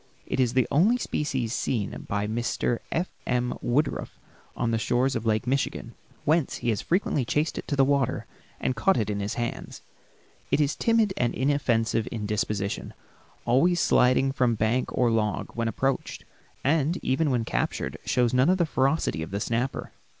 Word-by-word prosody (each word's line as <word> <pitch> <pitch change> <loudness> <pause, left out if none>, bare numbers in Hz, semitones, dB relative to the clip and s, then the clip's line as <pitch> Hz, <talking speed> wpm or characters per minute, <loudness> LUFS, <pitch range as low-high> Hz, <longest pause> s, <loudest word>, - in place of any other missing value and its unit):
It - - -3
is 125 -2 +2
the 130 -1 +3
only 200 - +4
species 135 - -2
seen 110 -7 -2
by 100 0 0
Mr. 120 +2 -1
F. 170 +3 0 0.2
M. 125 0 0
Woodruff 140 +5 -1 0.4
on 115 -1 0
the 115 - +1
shores 125 +4 +1
of 115 0 -2
Lake 110 +2 +1
Michigan, 125 -2 -1 0.3
whence 155 -1 +2
he 120 - -2
has 110 - 0
frequently 170 -6 0
chased 150 +6 -1
it - - -8
to 145 - -1
the 135 -1 +4
water 140 -2 +1 0.3
and 130 - -1
caught 190 +12 +3
it 105 -2 0
in 100 - -2
his 100 +1 -3
hands. 120 -1 -5 0.7
It - - +2
is 145 -1 +2
timid 225 -4 +2
and 120 -1 0
inoffensive 120 -5 +1
in 110 -3 -4
disposition, 105 -2 -2 0.5
always 170 +9 +3
sliding 130 -2 +3
from 125 -4 +1
bank 110 +4 0
or 120 -2 +2
log 105 -2 -1
when 115 -1 -1
approached, 135 +5 -2 0.4
and 155 +4 +2
even 145 +4 +1
when 120 -4 0
captured 65 -7 -2
shows 125 -1 +1
none 130 +5 +4
of 185 - +4
the 175 - +2
ferocity 135 - 0
of 80 - -5
the 100 +1 -3
snapper. 120 +5 -2
125 Hz, 175 wpm, -26 LUFS, 115-140 Hz, 0.7 s, only